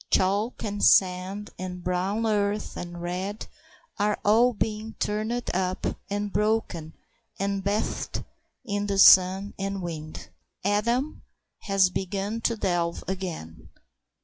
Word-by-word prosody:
Chalk 200 +5 +1
and 205 -1 -3
sand 190 +2 +3
and 180 -1 -5
brown 190 +5 0
earth 210 -1 0
and 175 0 -6
red 185 +4 -3 0.5
are 210 +1 +2
all 230 +4 +5
being 220 0 -3
turned 220 +3 -2
up 185 0 -1 0.2
and 205 0 -2
broken 210 -7 0 0.4
and 195 0 -1
bathed 205 +2 -2 0.4
in 205 -2 -2
the 200 -1 -1
sun 190 +1 +7
and 195 -1 -3
wind. 155 -2 -6 0.4
Adam 235 +8 0 0.4
has 195 -2 +3
begun 200 +4 -3
to 230 0 0
delve 175 -4 -1
again. 165 - -5
200 Hz, 120 wpm, -26 LUFS, 185-210 Hz, 0.5 s, sun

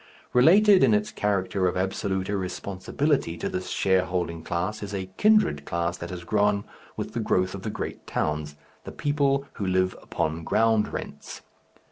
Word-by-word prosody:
Related 190 +9 +6
in 115 -5 +5
its 105 +1 -1
character 100 -3 0
of 90 - -1
absolute 95 0 -1
irresponsibility 95 - -1
to - - -3
this 90 0 -4
shareholding 90 -3 0
class 90 +6 -3
is 100 -1 -5
a 95 -1 -5
kindred 215 - +4
class 85 +2 -2
that 85 - -7
has 90 -2 -6
grown 105 +2 +1 0.3
with - - -4
the - - -2
growth 95 0 +1
of 100 - -6
the 110 - -4
great - - -6
towns, 75 -1 -2 0.3
the - - -7
people 140 -1 +1 0.2
who - - 0
live 95 0 +1
upon 80 +1 -2
ground 110 +3 +2
rents. - - -7
95 Hz, 160 wpm, -26 LUFS, 90-110 Hz, 0.3 s, Related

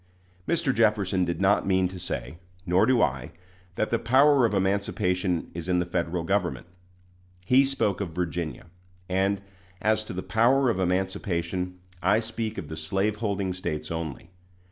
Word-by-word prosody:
Mr. 165 -5 +1
Jefferson 105 -5 +2
did 85 0 -3
not 100 +1 +3
mean 95 -1 +3
to 90 0 -8
say, 85 -1 -5 0.3
nor 90 +1 +3
do 130 -2 +4
I, 65 -2 -2 0.4
that 110 - -1
the 115 - +2
power 135 +2 +5
of 110 - -5
emancipation 95 -2 0
is 85 +1 -6
in 90 - +3
the 90 - +1
Federal 85 -1 -2
Government. 95 0 -1 0.8
He 130 +5 +5
spoke 120 -8 0
of 95 - -2
Virginia; 85 -1 -3 0.4
and, 95 +2 0 0.4
as 110 0 +1
to - - -7
the 95 0 -4
power 125 +3 +3
of 95 - -3
emancipation, 90 -1 -1 0.2
I 100 +4 +3
speak 110 -1 -4
of - - -5
the 80 - -7
slaveholding 100 +3 -1
States 75 -4 -4
only. 80 +1 -5
95 Hz, 155 wpm, -26 LUFS, 90-110 Hz, 0.8 s, power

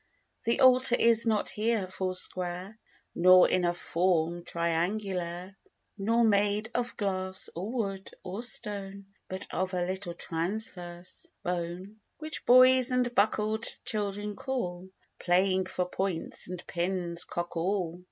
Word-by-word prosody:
The 235 +4 +1
altar 255 -1 +6
is 230 0 +3
not 215 -2 +1
here 220 -1 0
four 185 0 -4
square, 180 +2 0 0.4
Nor 185 +1 +6
in 185 - +1
a 175 - +2
form 175 -1 0
triangular; 175 +2 -2 0.4
Nor 225 +4 +1
made 210 0 +1
of 245 0 -3
glass, 190 -2 -2
or 190 +6 -5
wood, 195 -6 -3
or 190 +5 -5
stone, 200 -5 -1 0.2
But 190 +1 -5
of 185 0 -2
a 175 -1 0
little 185 -1 -4
transverse 175 0 -5
bone; 180 +4 -4 0.2
Which 310 -1 -5
boys 255 +1 +7
and 250 -1 0
bruckel'd 215 +1 +1 0.2
children 205 -1 -3
call 190 -9 -4 0.3
(Playing 185 +1 +2
for 180 - -2
points 185 -2 -1
and 180 -1 -7
pins) 175 -1 -1
cockall. 175 0 -3
190 Hz, 125 wpm, -29 LUFS, 175-215 Hz, 0.4 s, boys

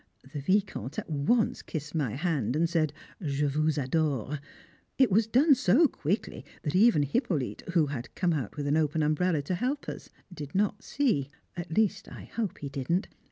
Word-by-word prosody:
The 145 - -3
Vicomte 185 - 0
at - - -4
once 155 +11 +1
kissed 150 -2 -6
my 140 -8 -1
hand 145 - 0
and 165 +2 +3
said, 160 -3 +1 0.3
"Je 145 -3 0
vous 155 +2 +1
adore." 145 -1 0 0.6
It 265 -5 +4
was 215 +3 +4
done 275 +7 +5
so 260 - +5
quickly 195 - -3 0.2
that 150 - -2
even 205 -6 +5
Hippolyte, 145 - -1
who 165 -3 +5
had 135 -4 -6
come 175 -2 +1
out 140 -4 -3
with 145 - -2
an 145 +2 +2
open 155 0 +1
umbrella 155 +1 +1
to 165 - -2
help 255 +9 -2
us, - - -7 0.2
did 145 -2 -8
not 205 +1 +1
see 225 - 0 0.3
at 170 -2 -5
least 220 -3 +2
I - - -9
hope 220 -6 -3
he 145 - -5
didn't. 140 - -1
160 Hz, 180 wpm, -29 LUFS, 145-200 Hz, 0.6 s, done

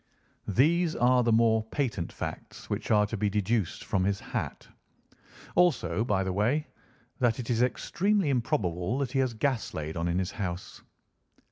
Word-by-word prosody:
These 160 - +3
are 125 +1 +4
the 120 -1 +2
more 110 0 +4
patent 110 - -2
facts - - -7
which - - -3
are 105 -1 +4
to 105 - -4
be 105 -1 0
deduced 105 -1 -1
from 95 -2 0
his 100 0 0
hat. - - -5 0.9
Also, 165 -10 +2
by 100 -5 +1
the 95 -1 -2
way, 120 +10 +1 0.5
that 120 -3 +2
it 125 -1 -4
is 115 0 +1
extremely 190 +8 +1
improbable 95 -4 0
that 135 -3 -2
he 135 - 0
has 130 -3 0
gas 130 +1 -1
laid 80 0 -4
on 85 +1 -1
in 85 +1 0
his 95 0 -1
house." 90 -3 -5
115 Hz, 165 wpm, -28 LUFS, 95-130 Hz, 0.9 s, are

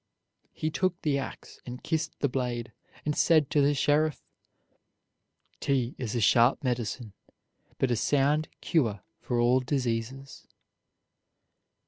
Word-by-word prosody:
He 155 - -3
took 185 +1 0
the 140 -3 +1
ax 135 - -8
and 125 +1 -8
kissed 160 0 -2
the 140 - +3
blade, 125 -2 -3 0.3
and 150 0 0
said 155 -4 +3
to 145 - +4
the 145 +1 +3
sheriff: 150 +2 +2 1.4
"'T 130 -3 0
is 125 -3 -3
a - - +1
sharp 115 +5 +4
medicine, 120 -3 -2 0.6
but 130 - +1
a - - +3
sound 145 +5 +2
cure 115 - 0 0.2
for 120 -1 -2
all 120 +2 +4
diseases." 130 0 -3
135 Hz, 125 wpm, -28 LUFS, 120-150 Hz, 1.4 s, to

